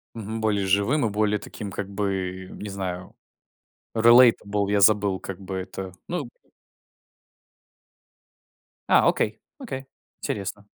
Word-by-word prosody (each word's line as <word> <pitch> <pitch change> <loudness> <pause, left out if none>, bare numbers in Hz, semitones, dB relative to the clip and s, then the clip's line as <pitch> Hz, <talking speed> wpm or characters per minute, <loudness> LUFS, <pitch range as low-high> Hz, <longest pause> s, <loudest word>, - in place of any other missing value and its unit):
Мгм. 110 0 -5
Более 105 -3 +1
живым 100 +8 +2
и - - -1
более 105 0 +1
таким 100 0 -8
как 95 +1 -5
бы, 95 -2 -3
не 105 - -7
знаю, 95 -2 -5 0.8
relatable, 110 -4 +5
я 100 -1 +3
забыл 100 -2 +4
как 95 -1 -7
бы 95 0 -6
это, 95 0 -6 0.2
ну 160 -8 -3 2.6
А, - - +5
окей, - - 0 0.2
окей, 225 - -6 0.4
интересно. 100 +1 -4
100 Hz, 115 wpm, -25 LUFS, 95-110 Hz, 2.6 s, relatable